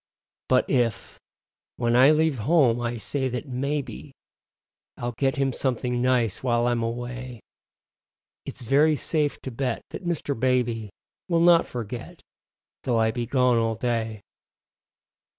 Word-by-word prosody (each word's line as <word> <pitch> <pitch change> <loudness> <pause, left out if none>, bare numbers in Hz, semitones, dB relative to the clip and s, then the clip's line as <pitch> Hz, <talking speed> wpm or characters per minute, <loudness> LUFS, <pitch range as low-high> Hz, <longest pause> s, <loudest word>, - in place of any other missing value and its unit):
But 130 0 +3
if, 120 -6 -1 0.6
when 120 -1 +1
I 130 +3 +7
leave 155 -3 +2
home, 125 -2 +3
I 120 0 -2
say 130 +4 -2
that 125 +4 -5
maybe 135 -1 -4 0.8
I'll 120 0 -3
get 135 +4 0
him 135 -2 0
something 125 -1 -1
nice 120 -5 +1
while 120 -2 +1
I'm 120 -1 +1
away, 120 +1 -5 1.0
It's 130 - -8
very 145 +6 +4
safe 150 0 -1
to 130 - -5
bet 125 0 -2
that - - -7
Mr. 170 -4 -2
Baby 120 -4 0 0.4
Will 170 -1 +3
not 170 -1 +5
forget, 120 0 -7 0.6
though 120 -3 +1
I 110 0 +3
be 120 +1 -3
gone 125 -2 +3
all 115 -1 +1
day. 110 -2 -2
125 Hz, 135 wpm, -25 LUFS, 120-135 Hz, 1.0 s, I